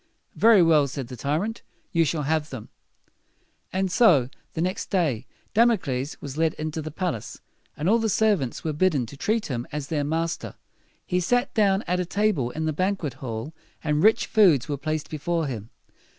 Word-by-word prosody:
"Very 220 -5 +6
well," 155 -4 +4
said 135 -2 -6
the 125 - -7
tyrant. 155 - -2 0.3
"You 165 -2 +3
shall 150 0 -1
have 155 +1 0
them." 125 -5 -8 1.0
And 190 0 -1
so, 165 - +5 0.3
the 160 - -1
next 185 +2 -2
day, 160 - 0 0.3
Damocles 180 - +1
was 140 +1 -7
led 160 -1 +2
into 155 +1 -4
the 155 - -5
palace, 160 - -4 0.4
and 150 - -2
all 225 +4 +4
the 225 -1 0
servants 200 - +1
were 155 - -1
bidden 150 -5 +2
to 130 - -11
treat 215 +9 0
him 125 -2 -4
as 145 -1 -5
their 150 -3 0
master. 165 +3 -2 0.5
He 180 - 0
sat 245 +9 +1
down 200 -2 +3
at 180 +1 -1
a 180 - 0
table 200 - +1
in 160 +5 -4
the 155 - 0
banquet 185 -4 -1
hall, 115 +3 -5 0.3
and 150 -1 +1
rich 220 +4 +4
foods 175 - +4
were 145 - -1
placed 155 +2 -3
before 165 +2 -2
him. 115 -6 -5
160 Hz, 180 wpm, -25 LUFS, 140-190 Hz, 1.0 s, Very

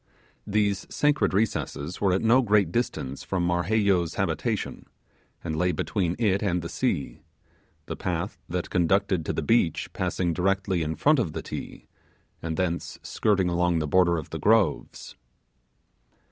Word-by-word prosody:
These 100 -2 0
sacred 150 0 +2
recesses 95 -6 -2
were 100 -2 +3
at 95 - +1
no 120 +4 +5
great 105 -7 +2
distance 70 - -2
from 90 -2 -1
Marheyo's 90 0 +1
habitation, - - -2 0.6
and 80 -2 -3
lay 90 +3 +1
between 90 +2 -1
it 100 -4 +1
and 90 -4 0
the 85 - -5
sea; - - -2 0.7
the - - -5
path 90 +2 -3
that 90 0 -3
conducted 95 0 +2
to - - +1
the 80 - -2
beach 90 -2 +1
passing 85 -2 -1
directly 95 0 0
in 80 0 -2
front 150 -1 +3
of 90 -10 -1
the - - -5
Ti, - - -7 0.6
and 80 -1 -3
thence 85 -2 -2
skirting 100 -4 +1
along 85 0 +1
the 80 - 0
border 85 +1 +3
of 80 - -7
the - - -4
groves. 110 -2 +1
90 Hz, 150 wpm, -26 LUFS, 85-105 Hz, 0.7 s, no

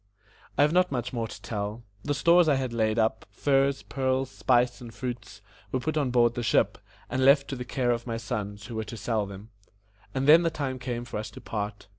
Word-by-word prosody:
I - - +6
have 150 +2 +3
not 180 -2 +3
much 125 -1 -3
more 115 -2 -2
to - - -10
tell. 105 +1 -4 0.2
The 145 0 -1
stores 170 +3 +5
I 145 - +4
had 130 -3 -2
laid 110 -1 +1
up 110 0 +1
furs, 135 -1 +1
pearls, 130 -1 -1
spice, 125 -1 +2
and 120 -2 -8
fruits 115 -4 -6 0.3
were 130 - 0
put 155 +5 -2
on 145 -4 +1
board 120 -1 +3
the 120 - -3
ship, 115 - +2 0.3
and 130 0 -1
left 140 +1 +5
to 135 - -3
the 125 -1 -6
care 125 0 0
of 120 +1 -2
my 115 -1 -2
sons, 105 -2 -4
who 115 - -8
were 110 - -2
to 115 - -8
sell 110 -3 -1
them. 100 +2 -10 0.7
And 135 +1 0
then 160 +3 +9
the 170 - +2
time 135 -5 -3
came 120 -1 -4
for 120 - -5
us 110 +1 -5
to - - -11
part. 105 -2 -5
120 Hz, 230 wpm, -27 LUFS, 110-135 Hz, 0.7 s, then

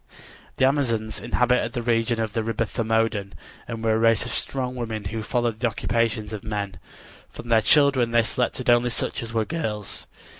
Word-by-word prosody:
The 130 - +4
Amazons 115 -6 0
inhabited 125 -1 +1
the 120 - -3
region 115 0 +1
of 110 -2 -2
the 115 - 0
river 115 +1 -1
Thermodon 110 -2 -1 0.3
and 115 -1 -5
were 110 -1 +3
a 110 - +2
race 115 0 +3
of 125 - -5
strong 130 -2 -2
women 115 -3 -4
who 110 +3 -4
followed 120 0 -1
the 125 - +2
occupations 115 -1 -1
of 105 - -6
men. 100 -4 -4 0.5
From 120 - -10
their 115 -1 +5
children 140 -2 +4
they 115 0 +4
selected 125 +2 -1
only 120 0 +4
such 115 - -2
as 115 -1 -6
were 110 -1 0
girls. 110 - -4
115 Hz, 185 wpm, -24 LUFS, 110-120 Hz, 0.5 s, their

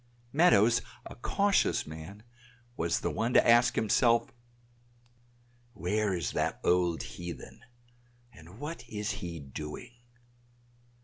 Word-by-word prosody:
Meadows, 115 - +5 0.2
a - - -8
cautious 200 - +1
man, 80 +7 -10 0.5
was 85 -3 -1
the - - -1
one 115 +3 -1
to - - +6
ask 120 +1 +5
himself, 115 +2 +2 1.4
"Where 105 +1 0
is 85 -4 -2
that - - -1
old 90 -2 +2
heathen, 85 +6 -9 0.7
and 85 +1 -14
what 150 +4 -6
is 105 0 -3
he 85 -5 -6
doing?" 75 - -8
105 Hz, 110 wpm, -30 LUFS, 85-120 Hz, 1.4 s, to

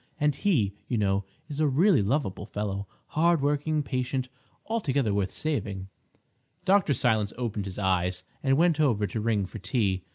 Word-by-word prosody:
And 150 -1 +3
he, 135 - +1
you 120 - 0
know, 100 -1 +1 0.2
is 150 -1 -6
a 155 - +4
really 155 - +4
lovable 100 -3 -1
fellow, 100 -2 -3 0.2
hard 170 +1 +3
working, 150 +2 +1
patient—altogether 130 - -2
worth 100 -2 +1
saving." 100 -11 -3 0.8
Dr. 190 -7 +4
Silence 110 -4 +1
opened 110 -5 -2
his 95 -2 -6
eyes 90 -2 0 0.2
and 135 -1 +3
went 165 -1 +3
over 120 -9 +3
to 105 +3 -3
ring 105 -3 +1
for 110 - -8
tea. 95 -4 0
125 Hz, 155 wpm, -27 LUFS, 100-150 Hz, 0.8 s, a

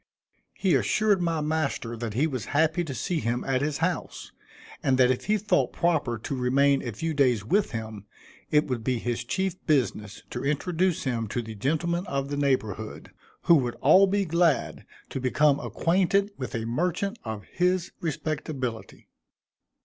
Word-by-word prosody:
He 190 -4 +1
assured 210 -3 +2
my 165 -2 0
master 150 -6 -1
that 115 -2 -5
he 140 +6 +3
was 130 -9 -3
happy 160 +3 +2
to 135 -4 -5
see 175 +2 -1
him 120 -2 -1
at 135 -1 0
his 145 0 -1
house, 180 -2 -4 0.5
and 130 -1 +2
that 130 -1 +5
if 130 - -2
he 215 +1 +2
thought 190 - +1
proper 150 -9 +1
to 125 +5 -4
remain 135 +2 +3
a 120 - -4
few 160 +10 -3
days 125 -8 +2
with 200 - +2
him, 110 -3 -6 0.4
it 150 0 +3
would 125 -5 -3
be 125 +1 0
his 120 0 -2
chief 190 +8 -2
business 115 -8 0
to 120 - -4
introduce 170 +5 0
him 115 -4 -1
to 120 +4 -3
the 110 0 -7
gentlemen 170 - -1
of 140 -3 -2
the 145 - -3
neighborhood, 130 -8 -2 0.3
who 170 - +6
would 125 -4 -1
all 185 +8 +6
be 200 +1 +1
glad 170 -5 +1 0.2
to - - -4
become 140 +3 +3
acquainted 195 +4 +1
with 130 - -5
a 115 -1 -2
merchant 180 - -1
of 110 -2 -5
his 180 0 0
respectability. 145 -6 -4
140 Hz, 170 wpm, -26 LUFS, 120-170 Hz, 0.5 s, who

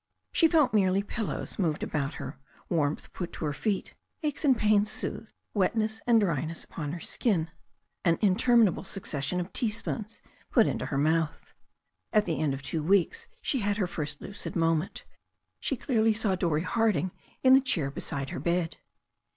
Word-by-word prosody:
She 330 - +5
felt 310 -7 +3
merely 195 -1 +3
pillows 215 0 -4
moved 160 -5 0
about 145 0 -2
her, 135 0 -7 0.3
warmth 155 -3 -1
put 175 -2 -4
to - - -4
her 145 - -1
feet, 200 +6 -2 0.3
aches 295 0 -2
and 270 -5 +5
pains 210 -1 +3
soothed, 220 +1 -3 0.2
wetness 220 +2 +1
and 235 -2 +6
dryness 165 -4 -1
upon 150 -2 -5
her 175 - -5
skin, 165 -5 0 0.5
an 170 -2 +3
interminable 215 0 +4
succession 180 -4 -2
of 175 +1 -5
teaspoons 225 -2 -2 0.3
put - - +5
into - - -1
her 135 - -2
mouth. 160 +2 0 0.6
At 215 -1 +4
the 165 -3 -1
end 145 -3 +1
of 135 - -9
two 160 +2 -2
weeks 200 - +2 0.2
she 270 - 0
had 205 -1 0
her 200 - +1
first 150 -4 -4
lucid 205 - -6
moment. 165 0 0 0.5
She 275 - -1
clearly 225 -3 +2
saw 210 -2 +2
Dorrie 170 -4 +1
Harding 215 -2 +1 0.3
in 260 0 +7
the 265 - +8
chair 170 - 0
beside 135 -1 -3
her - - -4
bed. 170 +2 0
185 Hz, 165 wpm, -29 LUFS, 160-220 Hz, 0.6 s, the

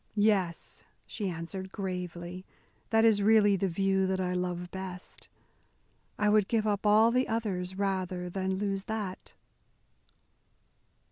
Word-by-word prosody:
"Yes," 205 -5 0 0.2
she 205 -3 -3
answered 185 +3 -6
gravely, 180 -2 -5 0.5
"that 225 0 +4
is 215 -2 +4
really 205 -1 +5
the 195 +1 0
view 190 +1 +1
that 190 0 -1
I 180 -1 -1
love 180 -1 -3
best. 185 -1 -8 0.9
I 210 - +1
would 210 -1 +4
give 225 -2 +1
up 205 0 0
all 215 +2 +6
the 255 +2 +2
others 190 -5 -2
rather 185 -2 -2
than 190 +1 -2
lose 195 0 -2
that." 210 -4 -5
190 Hz, 130 wpm, -30 LUFS, 180-210 Hz, 0.9 s, all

